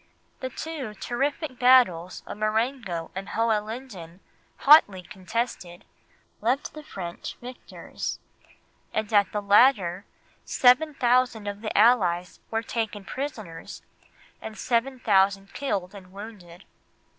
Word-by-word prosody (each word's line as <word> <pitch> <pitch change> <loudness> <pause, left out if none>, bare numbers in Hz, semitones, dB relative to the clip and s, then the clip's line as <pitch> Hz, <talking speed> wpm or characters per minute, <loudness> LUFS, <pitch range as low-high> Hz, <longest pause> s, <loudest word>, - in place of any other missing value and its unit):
The 260 - -4
two 270 -6 -6
terrific 270 - -3
battles 235 -9 +4
of - - -8
Marengo 215 -5 -1
and 195 +1 -6
Hohenlinden, 215 -5 -3 0.4
hotly 205 - +6
contested, 190 -2 -5 0.6
left 250 +6 0
the 305 - -9
French 175 -11 -7
victors; 250 +1 -7 0.8
and 220 0 -2
at 200 -2 +4
the 210 -1 -3
latter 200 -3 +4 0.4
seven 280 +5 +4
thousand 245 -3 +2
of 205 0 -5
the 220 - -3
Allies 185 -6 +3
were 225 0 -1
taken 220 -4 -3
prisoners, 215 - -7 0.6
and 220 -1 -8
seven 250 +2 0
thousand 195 -2 +2
killed 200 -9 -3
and 185 -2 -12
wounded. 195 -3 -11
215 Hz, 110 wpm, -26 LUFS, 190-250 Hz, 0.8 s, hotly